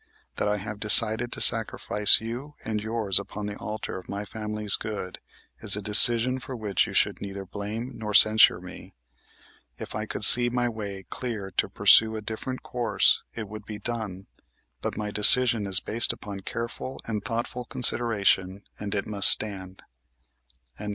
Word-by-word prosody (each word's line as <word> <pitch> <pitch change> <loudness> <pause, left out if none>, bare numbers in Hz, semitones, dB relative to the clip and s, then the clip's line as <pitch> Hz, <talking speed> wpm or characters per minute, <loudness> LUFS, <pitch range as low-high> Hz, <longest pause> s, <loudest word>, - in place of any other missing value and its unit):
That - - -3
I 105 0 -3
have 105 +1 -10
decided 110 +2 +5
to - - -8
sacrifice 105 -2 +2
you 125 +6 -10
and 110 -1 -5
yours 110 -3 -2
upon 100 +1 -10
the 105 0 -8
altar 105 -2 -8
of 90 - -19
my 100 +1 -8
family's 105 0 -1
good 105 -4 -9 0.4
is 105 -3 +4
a - - -6
decision 120 +5 +6
for 130 +2 -11
which 105 -5 -3
you - - -10
should - - -1
neither 100 -1 -9
blame 105 +6 -9
nor 110 -2 -9
censure 110 0 +4
me. - - -15 0.8
If - - -11
I 110 0 -7
could 105 - -7
see 120 +1 +10
my 120 0 -3
way 100 -4 -9
clear 105 -2 -9
to - - -4
pursue 110 0 +3
a 110 - -8
different 110 +4 -9
course 120 -2 -2
it 110 -3 -9
would 105 0 -13
be 105 -1 -10
done; 105 -4 -8 0.6
but - - -7
my 105 -1 -7
decision 110 0 +3
is 95 -1 0
based 115 +2 -1
upon 100 -1 -11
careful 115 +6 -9
and 110 -2 -7
thoughtful 120 +1 -7
consideration 100 -6 -1 0.2
and 105 0 -7
it 100 - -5
must 100 -2 +5
stand." 95 -3 0
110 Hz, 165 wpm, -23 LUFS, 100-115 Hz, 0.8 s, see